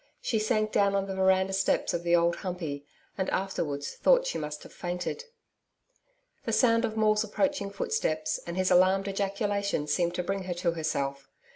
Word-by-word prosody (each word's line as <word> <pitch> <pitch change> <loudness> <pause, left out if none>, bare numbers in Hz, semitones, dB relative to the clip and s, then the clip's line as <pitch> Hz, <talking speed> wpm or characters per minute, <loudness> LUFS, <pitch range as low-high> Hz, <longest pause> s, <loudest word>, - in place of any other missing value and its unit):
She 225 - -1
sank 215 0 +1
down 200 0 +3
on 195 0 +1
the 195 - -4
veranda 190 0 +3
steps 195 0 +1
of 170 - -1
the 170 0 +3
Old 170 0 +2
Humpey, 160 -7 -5 0.3
and 190 - 0
afterwards 150 -7 -2
thought - - +4
she - - -2
must 150 -1 -5
have - - -13
fainted. 180 - -4 1.2
The - - -2
sound 230 -2 +4
of 220 -1 -4
Maule's 215 0 +3
approaching 220 0 -1
footsteps 200 - -1
and 170 +1 -4
his 185 0 +1
alarmed 190 +2 +4
ejaculation 200 -3 -1
seemed 170 +4 0
to 180 - -1
bring 195 +1 -3
her 180 -1 -3
to 175 0 0
herself. 140 -4 -3
190 Hz, 175 wpm, -28 LUFS, 170-205 Hz, 1.2 s, thought